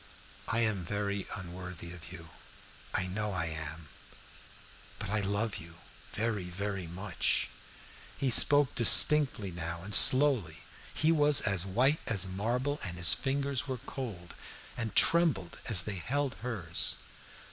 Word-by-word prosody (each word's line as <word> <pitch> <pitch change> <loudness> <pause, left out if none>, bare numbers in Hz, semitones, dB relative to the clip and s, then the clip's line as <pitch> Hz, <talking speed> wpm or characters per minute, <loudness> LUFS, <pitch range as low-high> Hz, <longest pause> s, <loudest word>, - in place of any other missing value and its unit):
"I 115 - -1
am 110 -5 -2
very 100 +2 -4
unworthy 90 -2 -10
of 85 -1 -13
you 85 -3 -12 0.6
I 95 - -1
know 105 +3 -4
I 90 -2 -3
am 80 -1 -8 1.1
but - - -7
I 110 - -1
love 100 +2 -3
you 85 0 -12 0.4
very, 105 -4 -3
very 95 0 -6
much." 90 +2 -2 0.7
He 135 -2 -1
spoke 145 +3 +6
distinctly 130 -3 +6
enough 85 -1 -8
now, 85 - -13
and 105 +2 -8
slowly. 130 - +4 0.3
He 155 +2 0
was 150 -3 +5
as 95 -2 -1
white 130 +10 0
as 100 -5 +1
marble, 120 +9 -3
and 90 -2 -5
his 90 -1 +3
fingers 140 0 -2
were 130 -1 -4
cold, 115 -8 -9 0.4
and 115 -3 -6
trembled 155 - +2
as 95 -6 +2
they 100 -1 -5
held 140 +6 -3
hers. 100 -9 0
100 Hz, 140 wpm, -29 LUFS, 90-130 Hz, 1.1 s, spoke